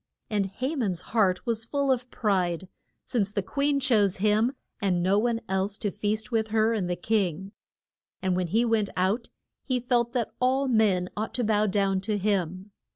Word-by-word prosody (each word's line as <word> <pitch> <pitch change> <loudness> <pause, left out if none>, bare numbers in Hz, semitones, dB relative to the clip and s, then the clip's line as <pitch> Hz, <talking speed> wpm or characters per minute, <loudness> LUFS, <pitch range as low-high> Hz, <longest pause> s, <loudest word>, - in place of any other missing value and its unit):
And 205 -2 +1
Ha 255 +10 -3
man's 195 - -1
heart 195 -5 +2
was 230 -2 0
full 280 +3 0
of 250 -1 -1
pride, 185 -6 0 0.4
since 205 -6 0
the 200 -2 -1
queen 280 +6 0
chose 215 -8 +3
him 215 +5 +2 0.3
and 180 -4 +1
no 195 +3 +3
one 230 0 0
else 190 +2 -1
to 205 -3 -2
feast 215 +2 -2
with 220 -1 +1
her 220 +1 +2
and 195 -5 -1
the 175 - 0
king. 195 -2 -1 0.7
And 185 -1 0
when 180 -1 0
he 225 +8 +2
went 220 -3 +1
out 195 +6 0 0.3
he 255 -2 0
felt 240 -1 +1
that 240 -3 -1
all 265 +2 +2
men 210 -7 +3
ought 215 +1 -3
to 245 - 0
bow 215 -1 +2
down 195 -1 +1
to 210 +1 -1
him. 190 -1 -1
210 Hz, 185 wpm, -27 LUFS, 190-235 Hz, 0.7 s, chose